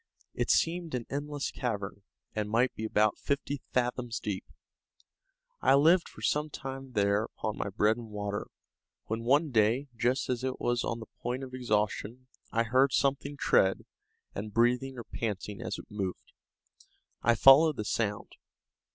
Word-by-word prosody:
It - - -2
seemed 165 -3 +1
an 120 -2 -3
endless 145 0 -3
cavern, 105 -6 -3 0.3
and 105 -1 -1
might 120 +4 +2
be 110 - -5
about 110 0 +2
fifty 140 0 -2
fathoms 125 -1 -1
deep. 100 -3 -3 1.2
I - - +5
lived 165 +5 +5
for - - -13
some 150 +1 +1
time 135 -2 -7
there 100 0 +2
upon 110 -2 -5
my - - -2
bread 105 +3 +2
and 115 -2 -8
water, 105 -1 -4 0.6
when 110 +1 -3
one 145 +5 +3
day, 120 +5 +2
just 125 +4 +1
as 125 -1 -2
it 130 0 -2
was 120 -1 0
on 115 0 -3
the - - -7 0.2
point 125 +2 -2
of 130 -1 -8
exhaustion, 115 0 -1 0.3
I 115 +1 +2
heard 130 +4 +3
something 140 +1 0
tread, 95 -7 +3 0.5
and 105 +2 -5
breathing 125 +4 +2
or 120 - -5
panting 105 -3 -4
as - - -3
it - - -9
moved. 95 -3 -5 0.9
I 120 +1 +4
followed 140 +6 +7
the 105 - -3
sound. 105 -2 -2
120 Hz, 160 wpm, -30 LUFS, 105-135 Hz, 1.2 s, followed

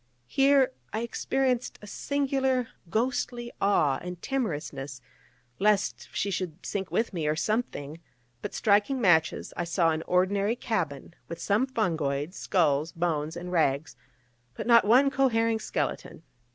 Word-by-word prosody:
Here 270 - +4 0.2
I 220 - -2
experienced 250 +1 -1
a - - -12
singular 265 0 0 0.2
ghostly 240 +2 -1
awe 155 -9 +3
and 180 0 -6
timorousness, 150 - -3 0.6
lest 205 0 +1
she 200 - -1
should 180 -2 -4
sink 195 -2 -3
with 225 -1 0
me, 160 -4 -2
or 150 - +1
something: 160 - -2 0.4
but - - -5
striking 210 +6 +2
matches, 175 -7 +2
I - - -1
saw 170 -1 +2
an 160 0 -2
ordinary 200 +4 +2
cabin, 170 - -3
with 170 - -6
some 210 +9 +1
fungoids, 160 - -1
skulls, 155 -3 +1
bones 165 -1 -1
and 180 +1 -6
rags, 155 -3 +1 0.6
but - - -5
not 235 -3 +6
one 260 +6 +5
cohering 230 -4 +2
skeleton. 170 - -3
200 Hz, 135 wpm, -28 LUFS, 160-240 Hz, 0.6 s, not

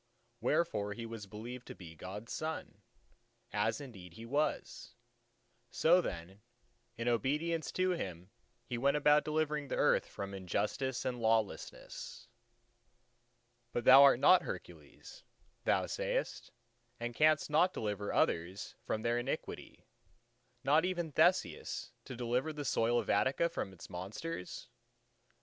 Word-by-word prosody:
Wherefore 120 -6 0
he 115 +1 -6
was 115 -3 -7
believed 120 +5 -8
to - - -8
be 85 -3 -11
God's 100 +7 -7
son, 160 +1 -5 0.7
as 105 +2 +1
indeed 95 -11 -10
he 115 - -9
was. 140 -2 -2 0.7
So 175 +3 +4
then 90 - -6 0.6
in 115 +1 -3
obedience 150 +8 0
to 185 0 +2
Him, 90 - -5 0.3
he 120 0 -4
went 140 +3 +3
about 150 0 +5
delivering 150 -1 -1
the - - -2
earth - - +3
from 100 0 -6
injustice 105 +8 -2
and 125 -2 -2
lawlessness. 115 +1 -2 1.5
But 120 - -1
thou 135 +2 +10
art 140 -3 +7
not 185 - +7
Hercules, - - -9 0.4
thou - - +3
sayest, - - -2 0.5
and 120 0 -3
canst 155 +2 +3
not 175 +5 +4
deliver 105 - -3
others 90 +5 0
from 110 - -3
their 120 +1 +1
iniquity—not 125 +2 -4
even 175 -3 -1
Theseus, - - +1
to 130 - -7
deliver 125 +5 -1
the 150 -1 -6
soil 120 -1 +2
of - - -1
Attica 140 +6 +2
from 95 - -4
its 95 - -11
monsters? 95 - -6
120 Hz, 125 wpm, -34 LUFS, 105-150 Hz, 1.5 s, thou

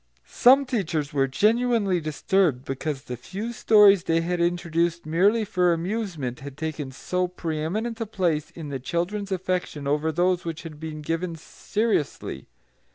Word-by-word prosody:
Some 265 +3 +5
of - - -5
the 250 -2 -1
teachers 155 -6 -2
were 135 -1 +2
genuinely 215 - +2
disturbed 155 -2 +1
because 135 +1 -3
the 125 - -5
few 205 - -6
stories 205 -5 +6
they 165 0 +2
had 175 +1 -1
introduced 170 -1 0
merely 200 +8 +3
for 180 -4 +2
amusement 170 - -3
had 140 0 -9
taken 155 -3 -4
so 180 +7 -1
pre 165 -3 -4
eminent 220 +9 -2
a 225 - -2
place 175 -8 0
in 160 -3 -8
the 135 -2 -4
children's 185 +8 -2
affection 180 -5 -2
over 150 +2 +1
those 180 +2 +1
which 165 -1 -5
had 155 -3 -9
been 155 -1 -6
given 165 +2 -2
seriously. 165 - -2
170 Hz, 160 wpm, -25 LUFS, 155-200 Hz, -, stories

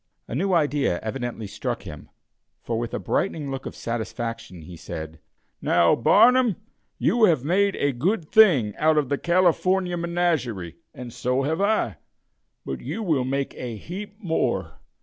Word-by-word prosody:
A - - -7
new 190 +9 0
idea 145 - +1
evidently 120 0 -4
struck 100 - -4
him, 75 -1 -10 0.5
for, 115 -1 -2
with 120 0 -4
a - - -2
brightening 150 -7 -2
look 135 -1 -5
of - - -8
satisfaction, 115 -5 -5
he 90 +2 -10
said: 80 -1 -7 0.4
"Now, 85 -1 +4
Barnum, 245 - +5 0.4
you 235 -2 +3
have 160 -10 +2
made 195 +6 +2
a 145 - +1
good 165 - -1
thing 145 - +5
out 155 0 +3
of 145 -4 +1
the 140 - 0
California 180 +1 +2
menagerie, 165 - -1
and 125 -2 -9
so 125 +2 0
have 160 +6 -1
I; 200 - +1 0.7
but 65 - -5
you 160 - -4
will 150 -9 +1
make 135 +1 -2
a 120 -3 -6
heap 195 - -8
more. 120 - -2
140 Hz, 155 wpm, -24 LUFS, 115-175 Hz, 0.7 s, Barnum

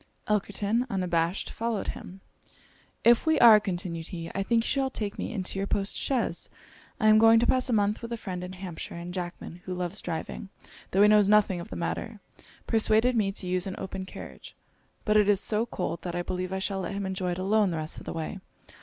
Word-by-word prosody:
Elkerton, 210 +3 0
unabashed, 175 -2 -1
followed 230 -2 -2
him. 190 +2 -8 0.8
'If 235 +6 +5
we 315 -1 +4
are,' 225 -3 +9
continued 175 -4 -4
he, 165 -2 -6
'I 195 - -1
think 230 +3 +2
you - - -4
shall 270 -1 +1
take 210 -5 -5
me - - -3
into 195 -3 -3
your 195 - -1
post 200 0 -1
chaise. 240 -10 -1 0.5
I 215 - +3
am 215 0 +7
going 225 0 +7
to 235 - +2
pass 255 +1 +2
a - - +1
month 210 -1 +1
with 230 0 -7
a 235 - -2
friend 185 -4 -5
in 180 +1 -7
Hampshire; 180 -4 -7
and 170 +1 -7
Jackman, 175 -1 -6
who 185 - -4
loves 180 +2 -3
driving, 175 +3 -5 0.4
tho' 195 +2 +4
he - - +7
knows 210 -1 +5
nothing 205 -4 +4
of 170 - -8
the - - -7
matter, 210 +5 -4 0.5
persuaded 225 +2 +3
me 205 -3 +2
to 195 - -4
use 180 +1 0
an 190 - -4
open 190 0 -6
carriage; - - -10 0.5
but 215 -1 +3
it 210 -1 +4
is 200 -2 +4
so 220 +3 +1
cold, 170 - -3
that 175 -1 -5
I 175 - -1
believe 185 +1 -3
I 190 - -1
shall 195 0 -2
let 185 +1 -4
him 200 0 -3
enjoy 185 -1 -2
it - - -6
alone 200 +2 +2
the 165 - -2
rest 155 0 -2
of - - -13
the - - -3
way. 165 +4 -4
195 Hz, 225 wpm, -27 LUFS, 180-215 Hz, 0.8 s, are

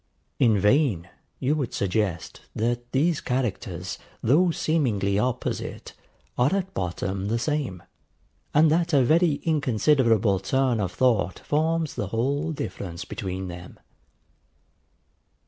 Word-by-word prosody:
In 115 -6 +4
vain 105 - +2 0.3
would 145 +4 +1
you 135 - 0
suggest 95 -3 -2
that 120 +2 -2
these 150 +4 +1
characters, 125 -5 -3 0.2
though 165 +9 +4
seemingly 115 -13 0
opposite, 125 +2 -3 0.5
are 130 +10 +3
at 190 -1 -2
bottom 95 +2 -3
the 115 +3 0
same, 130 - -2 0.7
and 155 +1 +5
that 170 +1 +1
a 140 -3 +5
very 165 +5 +4
inconsiderable 120 - +2
turn 130 +3 +1
of 95 -4 -1
thought 115 -7 +1
forms 160 0 0
the 105 - -3
whole 140 - -1
difference 90 - -5
between 95 -1 -5
them. 90 0 -10
125 Hz, 115 wpm, -25 LUFS, 100-150 Hz, 0.7 s, and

